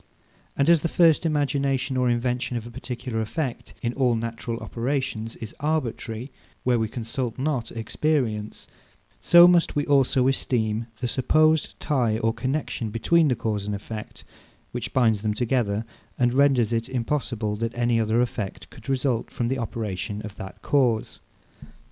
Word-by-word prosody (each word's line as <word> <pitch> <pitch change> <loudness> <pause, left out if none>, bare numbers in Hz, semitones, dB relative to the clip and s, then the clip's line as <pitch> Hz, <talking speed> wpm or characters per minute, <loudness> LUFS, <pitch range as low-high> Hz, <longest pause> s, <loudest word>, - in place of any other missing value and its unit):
And 140 - +2
as 170 -1 +6
the 165 - -1
first 165 -1 +4
imagination 140 -3 0
or 125 -1 +2
invention 120 +1 0
of 115 - -6
a 120 - -9
particular 120 -1 -4
effect, 125 +3 -4
in 120 0 0
all 125 -3 +2
natural 115 0 -4
operations, 120 -2 -3
is 110 0 -8
arbitrary, 130 -5 -2 0.3
where 125 -2 +2
we 110 - 0
consult 115 +1 -4
not 130 -4 -1
experience; 115 -2 -1 0.5
so 175 0 +8
must 175 -1 +3
we 145 0 +1
also 135 -2 +3
esteem 115 -4 0
the 125 - 0
supposed 155 +5 +2
tie 120 -7 +1
or 115 0 +1
connexion 125 -1 -2
between 155 +9 +3
the 130 - +2
cause 105 -3 -2
and 105 - -1
effect, 105 +2 -8 0.5
which - - -4
binds 110 -5 +3
them 105 -1 -1
together, 115 -3 0 0.3
and 120 -1 +2
renders 130 -4 +3
it 115 +2 -1
impossible 120 -4 -1
that 115 +2 -3
any 120 -1 +2
other 110 +2 +2
effect 110 -5 -4
could - - -12
result 130 -3 0
from 120 -1 -2
the 130 0 -1
operation 105 -2 -4
of 105 -1 -7
that 95 -2 -10
cause. 125 -6 +1
120 Hz, 155 wpm, -25 LUFS, 115-135 Hz, 0.5 s, so